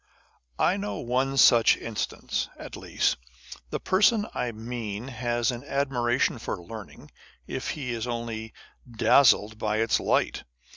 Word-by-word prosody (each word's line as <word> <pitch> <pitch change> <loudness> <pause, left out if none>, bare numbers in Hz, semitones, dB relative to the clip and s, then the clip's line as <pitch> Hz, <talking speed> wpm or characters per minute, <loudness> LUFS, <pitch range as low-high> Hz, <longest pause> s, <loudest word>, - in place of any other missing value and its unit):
I - - +2
know 100 0 -4
one 130 +4 -1
such 120 -3 +6
instance, 115 -2 -3
at - - -8
least. - - 0 0.5
The - - -3
person 205 +3 +3
I 125 -1 -2
mean 115 0 -5
has 120 -1 0
an 120 +1 -7
admiration 130 -3 0
for 105 - -4
learning, 100 +4 -10 0.3
if - - -4
he 130 -4 -3
is 115 0 -3
only 115 -2 -4 0.4
dazzled 110 -2 +4
by 110 -1 0
its 115 +1 +2
light. - - 0
120 Hz, 135 wpm, -27 LUFS, 110-125 Hz, 0.5 s, such